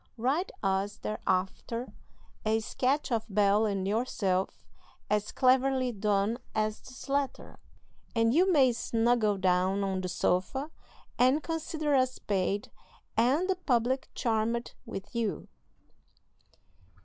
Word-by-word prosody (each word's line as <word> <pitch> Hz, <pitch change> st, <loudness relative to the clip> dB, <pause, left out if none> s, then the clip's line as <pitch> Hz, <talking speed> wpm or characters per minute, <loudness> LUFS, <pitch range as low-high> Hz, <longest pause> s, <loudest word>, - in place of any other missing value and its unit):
Write 275 Hz, -, 0 dB
us 195 Hz, +1 st, 0 dB
thereafter 215 Hz, +4 st, -2 dB, 0.5 s
a 220 Hz, +1 st, +2 dB
sketch 265 Hz, +6 st, -1 dB
of 225 Hz, -2 st, +1 dB
Bel 205 Hz, +1 st, +3 dB
and 195 Hz, -2 st, -1 dB
yourself 200 Hz, -4 st, 0 dB, 0.5 s
as 210 Hz, 0 st, +1 dB
cleverly 260 Hz, 0 st, +3 dB
done 210 Hz, +1 st, 0 dB, 0.2 s
as 215 Hz, 0 st, 0 dB
this 255 Hz, +2 st, -12 dB
letter, 280 Hz, -1 st, -2 dB, 0.6 s
and 230 Hz, 0 st, +3 dB
you 365 Hz, +5 st, +4 dB
may 270 Hz, -6 st, +5 dB
'snuggle' 230 Hz, -2 st, +1 dB
down 185 Hz, +1 st, +2 dB
on 190 Hz, -1 st, -1 dB
the 185 Hz, -, -3 dB
sofa 190 Hz, -, 0 dB, 0.5 s
and 260 Hz, +5 st, +4 dB
consider 315 Hz, -2 st, -2 dB
us 255 Hz, -1 st, +2 dB
paid, 200 Hz, 0 st, -1 dB, 0.4 s
and 265 Hz, +10 st, +3 dB
the 380 Hz, -, +1 dB
public 260 Hz, -5 st, 0 dB
charmed 230 Hz, 0 st, -1 dB
with 195 Hz, 0 st, -7 dB
you." 230 Hz, -3 st, -2 dB
230 Hz, 115 wpm, -30 LUFS, 200-260 Hz, 0.6 s, may